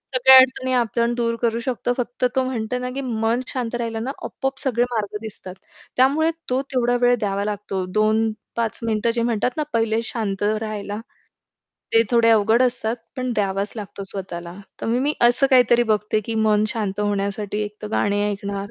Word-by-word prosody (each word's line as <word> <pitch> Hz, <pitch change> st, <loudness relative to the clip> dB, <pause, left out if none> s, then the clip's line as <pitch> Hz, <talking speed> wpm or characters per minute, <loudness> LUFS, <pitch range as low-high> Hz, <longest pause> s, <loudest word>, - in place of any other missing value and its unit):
सगळ्या 265 Hz, +1 st, +8 dB
अडचणी 260 Hz, 0 st, +4 dB
आपण 235 Hz, 0 st, +1 dB
दूर 230 Hz, -1 st, 0 dB
करू 230 Hz, -1 st, +1 dB
शकतो 245 Hz, 0 st, -1 dB
फक्त 245 Hz, 0 st, -2 dB
तो 260 Hz, -, +3 dB
म्हणतो 250 Hz, -2 st, -2 dB
ना, 250 Hz, 0 st, -3 dB
की 275 Hz, -, -2 dB
मन 230 Hz, -1 st, 0 dB
शांत 245 Hz, -2 st, -3 dB
राहिलं 225 Hz, -1 st, -3 dB
ना 265 Hz, -, -2 dB
आपोआप 270 Hz, 0 st, -3 dB
सगळे 240 Hz, -3 st, +1 dB
मार्ग 210 Hz, -2 st, -2 dB
दिसतात. 190 Hz, -4 st, -8 dB, 0.4 s
त्यामुळे 290 Hz, +6 st, +3 dB, 0.2 s
तो 255 Hz, +2 st, +1 dB
तेवढा 245 Hz, -1 st, +2 dB
वेळ 245 Hz, 0 st, +5 dB
द्यावा 200 Hz, -2 st, -1 dB
लागतो, 200 Hz, -3 st, -3 dB
2-5 220 Hz, +1 st, 0 dB
मिनिटं 225 Hz, +1 st, +1 dB
जे 235 Hz, -, +1 dB
म्हणतात 235 Hz, +3 st, 0 dB
ना 305 Hz, -, +1 dB
पहिले 225 Hz, 0 st, +1 dB
शांत 205 Hz, -5 st, -3 dB
राहायला. 215 Hz, -1 st, -2 dB, 1.0 s
ते 225 Hz, -, +7 dB
थोडे 230 Hz, -1 st, +4 dB
अवघड 220 Hz, +3 st, +4 dB
असतात 240 Hz, -2 st, 0 dB, 0.2 s
पण 255 Hz, -1 st, -2 dB
द्यावाच 200 Hz, 0 st, -1 dB
लागतो 205 Hz, -1 st, -7 dB
स्वतःला. 175 Hz, -3 st, -6 dB, 0.3 s
तर -, -, -4 dB
मग 235 Hz, +2 st, +1 dB
मी 295 Hz, +2 st, +1 dB
असं 245 Hz, +3 st, +3 dB
काहीतरी 245 Hz, -2 st, +5 dB
बघते 210 Hz, +1 st, 0 dB
की 230 Hz, -, -3 dB
मन 210 Hz, 0 st, +3 dB
शांत 210 Hz, -4 st, -3 dB
होण्यासाठी 205 Hz, 0 st, -1 dB
एकतर 210 Hz, 0 st, -8 dB
गाणे 205 Hz, 0 st, +1 dB
ऐकणार 200 Hz, 0 st, -4 dB
225 Hz, 175 wpm, -22 LUFS, 210-245 Hz, 1.0 s, सगळ्या